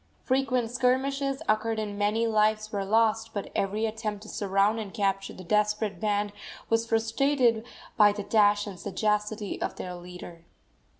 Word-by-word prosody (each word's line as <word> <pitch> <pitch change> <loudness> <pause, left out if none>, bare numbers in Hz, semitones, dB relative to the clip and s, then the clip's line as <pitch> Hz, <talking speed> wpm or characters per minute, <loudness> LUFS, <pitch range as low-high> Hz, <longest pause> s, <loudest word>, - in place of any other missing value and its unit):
Frequent 255 -3 +1
skirmishes 270 +2 0
occurred 220 +1 +1
and 210 -2 -3
many 210 +3 +1
lives 215 -1 +2
were 200 -2 -1
lost, 220 +2 +1
but 200 - -4
every 205 +3 0
attempt 215 -2 -4
to 215 - -11
surround 200 +2 +1
and 210 -3 -6
capture 195 -1 -1
the 185 - -10
desperate 210 0 0
band 205 0 0 0.4
was 225 0 +2
frustrated 230 +1 +2 0.3
by 210 -2 +7
the 205 0 -5
dash 205 -1 +3
and 195 -4 -8
sagacity 210 +1 -1
of - - -2
their 180 - -6
leader. 175 -1 -10
215 Hz, 155 wpm, -27 LUFS, 205-225 Hz, 0.4 s, by